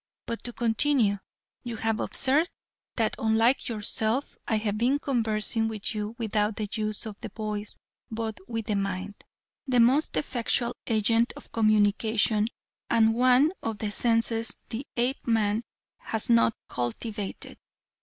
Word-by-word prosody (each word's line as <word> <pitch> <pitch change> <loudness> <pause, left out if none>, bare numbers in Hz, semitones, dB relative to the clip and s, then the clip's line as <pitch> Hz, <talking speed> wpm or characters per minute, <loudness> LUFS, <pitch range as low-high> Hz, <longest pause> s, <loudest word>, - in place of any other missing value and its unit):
But 230 - -4
to 240 - -4
continue, 230 -3 +2 0.4
you 240 -2 -5
have 225 0 -1
observed 290 +6 +2 0.5
that 225 -2 +1
unlike 225 +4 +2
yourself 220 +3 -1
I 220 - +2
have 210 -1 -1
been 255 +4 +3
conversing 225 -4 +2
with 220 0 -3
you 210 +1 -4
without 215 -2 0
the 210 0 -3
use 215 +1 -2
of 215 -2 -7
the - - -5
voice 210 -1 -5 0.3
but 220 -1 -4
with 225 -2 -3
the 210 - -1
mind, 195 0 -2 0.5
the 250 -2 +3
most 260 +6 +3
effectual 240 -3 0
agent 230 +1 +2
of - - -13
communication 215 0 +2 0.4
and 225 -1 +4
one 255 +5 +4
of 225 -2 -3
the 210 -1 -3
senses 230 0 +1
the 245 +4 -5
Apeman 230 -3 +1 0.3
has 220 +1 0
not 230 -1 +4
cultivated. 200 - -4
225 Hz, 135 wpm, -27 LUFS, 215-235 Hz, 0.5 s, and